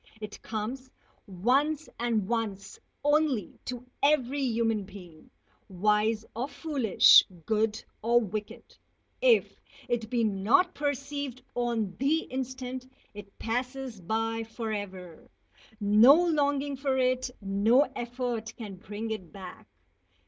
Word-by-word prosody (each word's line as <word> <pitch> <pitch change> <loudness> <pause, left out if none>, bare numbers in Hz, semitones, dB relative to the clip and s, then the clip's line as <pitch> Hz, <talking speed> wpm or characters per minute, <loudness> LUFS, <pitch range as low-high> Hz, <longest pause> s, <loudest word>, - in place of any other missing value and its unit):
It 210 -1 -8
comes 240 +5 -5 0.4
once 275 - +1
and 230 -5 0
once 215 -4 -3 0.2
only 290 - +1
to 250 0 -6 0.2
every 285 -1 +2
human 225 -4 +1
being, 180 -5 -13 0.4
wise 210 +3 +1
or 245 +4 -2
foolish, 280 - +5 0.2
good 220 0 0 0.2
or 235 +2 +4
wicked. 215 -1 -5 0.6
If - - +3 0.3
it 230 -2 -2
be 235 -1 +1
not 220 - +3
perceived 285 -2 -3
on 230 -6 -1
the 295 +5 +2
instant, 260 -1 -5 0.2
it 205 -1 -12
passes 250 -1 -3
by 225 +5 -1
forever. 205 -6 -6 0.5
No 215 +6 +7
longing 285 -4 +1
for 270 -1 0
it, 255 0 +1
no 205 +6 +3
effort, 240 -2 -4
can 205 -5 -7
bring 210 +4 -6
it 190 -6 -5
back. 190 -3 -10
235 Hz, 110 wpm, -28 LUFS, 210-265 Hz, 0.6 s, No